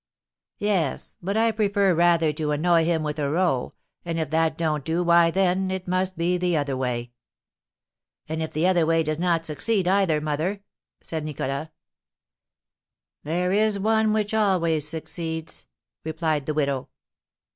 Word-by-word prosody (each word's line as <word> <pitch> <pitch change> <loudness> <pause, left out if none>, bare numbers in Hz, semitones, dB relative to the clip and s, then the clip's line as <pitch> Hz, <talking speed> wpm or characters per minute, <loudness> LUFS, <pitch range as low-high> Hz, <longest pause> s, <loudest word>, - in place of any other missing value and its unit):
"Yes, 195 -9 -1
but 200 +4 -2
I 225 +1 +3
prefer 200 -3 +2
rather 170 -2 +3
to 150 0 -3
annoy 165 +2 +3
him 165 -2 +1
with 150 0 -3
a 140 -1 0
row; 160 -5 0 0.3
and, 170 -1 -3
if 155 -2 -3
that 160 0 +1
don't 155 -3 -1
do, 165 +4 0
why, 170 -1 +5
then, 190 +1 +1
it 185 -1 -4
must 185 0 0
be 175 +2 +1
the 175 -2 +1
other 140 -2 -1
way." 120 -2 -3 1.2
"And 160 +1 -3
if 160 - -3
the 155 +3 0
other 180 -2 +3
way 165 0 +2
does 155 0 -2
not 170 -2 +1
succeed, 180 +6 0
either, 185 -5 +3
mother?" 155 +7 -2 0.4
said 160 -2 -4
Nicholas. 145 0 -4 1.5
"There 175 +4 -1
is 210 +1 +2
one 220 +2 +2
which 215 0 0
always 170 -8 +1
succeeds," 160 0 -5 0.4
replied 160 -2 -1
the 155 - -1
widow. 140 -3 -1
165 Hz, 155 wpm, -24 LUFS, 155-185 Hz, 1.5 s, why